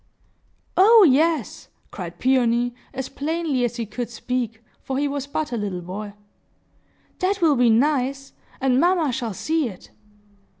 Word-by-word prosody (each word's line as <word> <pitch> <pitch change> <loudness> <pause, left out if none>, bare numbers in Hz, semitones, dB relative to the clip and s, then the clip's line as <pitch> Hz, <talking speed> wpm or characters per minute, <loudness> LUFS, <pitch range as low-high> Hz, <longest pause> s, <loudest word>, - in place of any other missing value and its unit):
"Oh 435 +3 +8
yes!" 305 -1 +1 0.2
cried 175 -3 -7
Peony, 245 -1 +2 0.2
as 265 0 -5
plainly 310 -3 -2
as 240 -1 -1
he 235 -2 -3
could 240 +3 -5
speak, 235 -1 -4 0.2
for 265 - -4
he 290 +1 +1
was 280 -1 -4
but 295 +1 -3
a 240 - -2
little 200 -4 -3
boy. 200 +4 -6 1.1
"That 390 +2 0
will 320 -5 +4
be 245 -2 +4
nice! 270 +2 +1 0.3
And 260 -1 +2
mamma 345 -3 +2
shall 230 -4 -3
see 315 - 0
it!" 185 - -13
260 Hz, 145 wpm, -23 LUFS, 230-300 Hz, 1.1 s, Oh